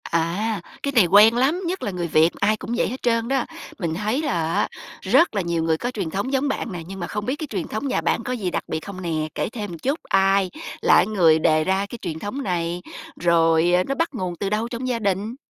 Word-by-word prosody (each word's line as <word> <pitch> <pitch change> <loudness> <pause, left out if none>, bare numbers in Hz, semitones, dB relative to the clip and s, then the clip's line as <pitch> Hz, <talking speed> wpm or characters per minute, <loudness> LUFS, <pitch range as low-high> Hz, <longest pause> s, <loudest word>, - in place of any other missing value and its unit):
À, 180 +6 -1 0.2
cái 280 - 0
này 225 -6 +6
quen 205 +6 +7
lắm, 275 +9 +2
nhất 370 +2 -3
là 205 - -2
người 175 -2 -3
Việt 160 +1 +4
ai 215 +1 +2
cũng 230 - -5
vậy - - +2
hết 255 - -6
trơn 230 -1 +1
đó. 265 -1 +1 0.3
Mình 170 -5 -1
thấy 215 - -1
là 170 - -1
á - - +1 0.3
rất 335 - +3
là 200 - +1
nhiều 170 -2 -1
người 160 -1 +1
có 245 +8 -3
truyền 195 -9 -3
thống 200 +10 -3
giống 270 +2 +1
bạn 270 - -2
nè, 175 -2 -5
nhưng 195 +1 -8
mà 175 - -3
không 210 0 -4
biết 260 - -1
cái 310 0 -6
truyền 190 -5 -3
thống 215 +6 -3
nhà - - 0
bạn - - 0
có 250 - -3
gì 200 -7 -2
đặc - - -2
biệt - - -2
không 185 +3 -8
nè? 160 -3 -2
Kể - - -1
thêm 215 -3 -5
một 170 - -7
chút, 275 - -1
ai 195 0 +3 0.3
là - - +5
cái - - +5
người 170 -7 +4
đề 155 0 +3
ra 190 +3 +1
cái 240 - -7
truyền 160 -4 -4
thống 230 +10 -4
này? 175 -2 -2 0.4
Rồi, 165 0 +3
ờ, 180 +1 +4
nó 275 - -3
bắt 330 +2 0
nguồn 185 -7 -3
từ 195 +3 -3
đâu 215 +3 0
trong 240 +1 -4
gia 245 -2 -1
đình? 200 +2 -1
200 Hz, 265 wpm, -23 LUFS, 170-235 Hz, 0.4 s, quen